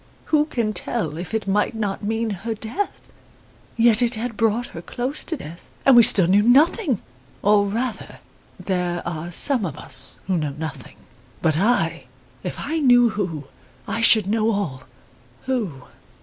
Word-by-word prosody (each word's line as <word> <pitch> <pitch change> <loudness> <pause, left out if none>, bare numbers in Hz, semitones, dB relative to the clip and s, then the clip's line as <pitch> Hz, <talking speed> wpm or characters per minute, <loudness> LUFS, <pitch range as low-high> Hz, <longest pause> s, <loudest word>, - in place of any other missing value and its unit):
Who 300 -1 +4
can 235 -8 -2
tell 165 -4 -3
if 175 +2 -7
it 220 -2 -3
might 205 +3 0
not 205 -3 -3
mean 220 +1 -1
her 220 +4 -4
death? 230 - -5 0.7
Yet 230 0 +4
it 240 -1 +2
had 230 +1 -4
brought 225 +2 0
her 165 - -7
close 250 - -5
to 325 - -3
death, 165 - -11 0.2
and 270 - +7
we 240 - +9
still 215 -6 +7
knew 195 +4 +4
nothing. 275 - +3 0.4
Or, 205 0 +4
rather, 230 +3 -4 0.4
there 180 -2 -2
are 170 0 -5
some 255 +6 +4
of 155 -6 -4
us 135 -2 -1
who 185 -1 0
know 150 -3 -3
nothing. 155 -5 -7 0.5
But 155 -2 +2
I 240 +6 0 0.4
if - - -6
I 320 +2 -2
knew 245 -4 +5
who, 180 -9 -4 0.4
I 230 - -2
should 220 -3 +5
know 220 +2 +1
all. 160 -12 -3 0.6
Who? 210 - -3
215 Hz, 165 wpm, -22 LUFS, 175-240 Hz, 0.7 s, we